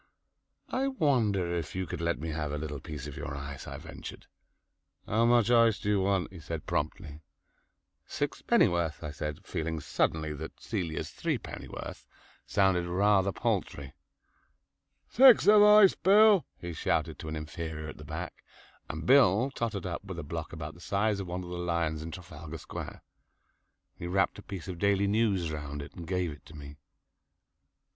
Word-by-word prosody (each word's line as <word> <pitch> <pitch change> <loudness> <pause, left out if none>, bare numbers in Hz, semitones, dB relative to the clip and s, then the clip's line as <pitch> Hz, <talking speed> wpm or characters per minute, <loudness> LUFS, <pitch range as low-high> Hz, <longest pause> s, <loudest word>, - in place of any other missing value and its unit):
"I 265 +1 0
wonder 115 - +1
if 85 -1 -4
you 95 0 -1
could - - -5
let 85 0 0
me 80 +2 -5
have 75 -1 -3
a 75 - -2
little 75 -1 -5
piece 75 -1 -7
of 75 -2 -7
your 70 - -5
ice," 70 0 -7
I - - -6
ventured. - - -9 0.8
"How 115 +3 +2
much 120 -1 +4
ice 115 -2 +5
do 105 - -3
you 100 -2 +3
want?" 95 -1 0
he 90 - -9
said 80 0 -6
promptly. 75 0 -3 0.9
"Sixpennyworth," 85 -3 +1
I 75 - -4
said, 75 +1 -5
feeling 80 0 -3
suddenly 80 +1 0
that 80 +2 -8
Celia's 90 -8 -3
threepennyworth - - -5 0.4
sounded 95 -3 +2
rather 100 +2 +3
paltry. 70 -5 -2 1.1
"Six 255 -1 +7
of 210 0 +8
ice, 210 -2 +8
Bill," 205 +1 +5
he 85 0 -6
shouted 80 -1 -1
to 80 - -7
an 80 - -4
inferior 80 0 -5
at - - -9
the - - -10
back, - - -7 0.5
and 80 0 -5
Bill 130 +1 +5
tottered 110 -7 -3
up 85 0 -4
with 95 -3 -7
a 85 - -4
block 80 +3 -5
about 80 -3 -6
the 85 - -16
size 100 +2 0
of 95 - -5
one 90 +1 -4
of 90 - -8
the 90 - -4
lions 85 -3 -1
in 80 - -6
Trafalgar 80 -2 -8
Square. - - -8 0.9
He 85 - -7
wrapped 95 +2 +1
a - - -8
piece 95 -4 -8
of 90 -3 -6
"Daily 100 0 +3
News" 100 -5 +1
round 75 -1 -5
it 70 - -8
and 85 -2 -9
gave 90 -3 -1
it 75 - -12
to 75 - -13
me. 75 0 -10
85 Hz, 170 wpm, -30 LUFS, 80-100 Hz, 1.1 s, of